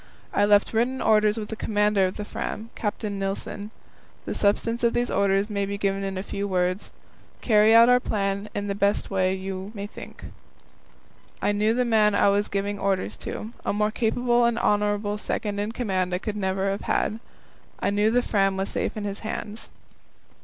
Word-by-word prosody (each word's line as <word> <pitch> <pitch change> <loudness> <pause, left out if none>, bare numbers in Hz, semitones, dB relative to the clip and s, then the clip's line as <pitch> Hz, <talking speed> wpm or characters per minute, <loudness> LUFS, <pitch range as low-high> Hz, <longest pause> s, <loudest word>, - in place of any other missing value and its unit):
I 205 - +3
left 205 +1 +4
written 245 +4 +1
orders 215 0 +3
with 210 -2 -5
the 220 - -4
commander 210 -3 +2
of 185 - -6
the 210 - -5
Fram, 220 +2 -5
Captain 205 -1 -3
Nilsen. 195 +1 -4 0.6
The - - -3
substance 230 +3 +1
of 235 - +3
these 240 0 0
orders 195 0 +2
may 200 -2 -2
be 200 0 -3
given 195 -1 -1
in 195 -1 -3
a 190 - -3
few 200 0 -3
words: 185 0 -1 0.5
Carry 215 -1 +5
out 230 +1 +8
our 250 0 +6
plan 200 -2 -2
in 205 - -2
the 200 +1 +1
way 190 -1 +1
you 190 0 -5
may 200 -1 -4
think 205 - -10
best. - - -10 1.1
I - - +3
knew 210 +2 +1
the 250 0 +2
man 215 -3 +3
I 200 - +4
was 205 +1 +1
giving 200 +1 -2
orders 190 - -1
to. 220 +2 -6
A - - 0
more 210 +1 +1
capable 240 +1 +2
and 235 -1 +1
honourable 205 -1 +1
second 205 -1 -3
in 205 +2 -2
command 190 -6 -1
I - - +1
could 210 +3 -4
never 195 -1 0
have 200 - -3
had. 220 - 0 0.6
I - - 0
knew 205 +1 +3
that 245 +2 +2
the - - -8
Fram 195 -2 +2
was 195 +1 -1
safe - - -2
in 210 - -3
his 200 0 -4
hands. 215 0 -6
205 Hz, 195 wpm, -25 LUFS, 195-220 Hz, 1.1 s, out